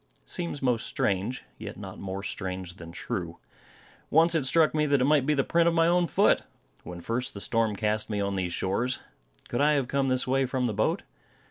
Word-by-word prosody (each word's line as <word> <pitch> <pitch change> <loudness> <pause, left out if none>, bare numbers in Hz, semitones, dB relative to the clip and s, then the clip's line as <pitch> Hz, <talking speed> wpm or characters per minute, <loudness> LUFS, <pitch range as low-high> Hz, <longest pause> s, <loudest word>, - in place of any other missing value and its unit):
It - - -16
seems 170 -6 -2
most 125 -3 +1
strange; 100 +6 -1 0.2
yet - - -7
not - - -8
more 95 0 -5
strange 95 -3 -5
than 85 -1 -9
true. 85 -1 -4 0.7
Once 165 +2 +5
it 155 -5 +2
struck 160 +2 +4
me 150 -1 +2
that 140 -1 +3
it - - +2
might 145 -2 +3
be 150 - +3
the 135 - +2
print 170 +3 +3
of 170 - +2
my 165 -1 +4
own 175 +1 +3
foot, - - +3 0.4
when 90 -1 -8
first 115 +5 -3
the - - -5
storm 110 0 +1
cast 105 +1 -1
me 105 -1 -1
on 100 -1 -1
these 90 -2 -1
shores. 115 +9 -1 0.5
Could 120 - -1
I 150 +1 +5
have 140 -4 +1
come 140 +1 0
this 130 -1 +1
way 135 +1 +1
from 130 0 -1
the 115 - 0
boat? 110 +2 0
125 Hz, 220 wpm, -28 LUFS, 100-145 Hz, 0.7 s, Once